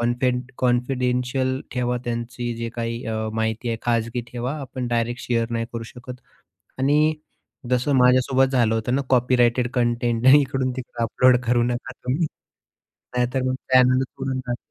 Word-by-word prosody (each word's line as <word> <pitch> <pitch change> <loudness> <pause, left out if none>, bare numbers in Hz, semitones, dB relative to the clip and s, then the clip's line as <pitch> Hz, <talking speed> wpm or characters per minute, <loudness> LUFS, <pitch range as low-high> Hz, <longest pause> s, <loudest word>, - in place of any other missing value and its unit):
Content 125 +1 0
confidential 125 +1 0
ठेवा 125 -1 -1
त्यांची 120 0 -3
जी 115 0 -3
काही 115 +1 -3
अ, 110 0 -2
माहिती 110 +1 -1
आहे 115 - -1
खाजगी 115 0 0
ठेवा, 125 +4 -3
आपण 130 -2 -5
डायरेक्ट 120 0 -1
शेअर 115 -1 -1
नाही 115 0 -2
करू 115 -1 -4
शकत. 125 0 -9 0.6
आणि 150 +3 +3 0.6
जसं 125 +3 +1
माझ्यासोबत 130 +1 +4
झालं 120 -4 +3
होतं 115 +2 -1
ना, 140 - +1
कॉपीराइटेड 125 -1 +3
कंटेंट 120 -1 0
नाही 135 +3 +8
इकडून 130 -1 -1
तिकडे 120 -2 -5
अपलोड 125 +3 +4
करू 120 0 +3
नका 125 +2 -2
तुम्ही 135 +7 -2 0.9
नाही 125 0 +3
तर 130 - +1
मग 130 - 0 0.2
चॅनलचं 130 +1 +3
उडून 135 -1 -1
जाईल. 120 -1 -4
125 Hz, 155 wpm, -23 LUFS, 120-130 Hz, 0.9 s, नाही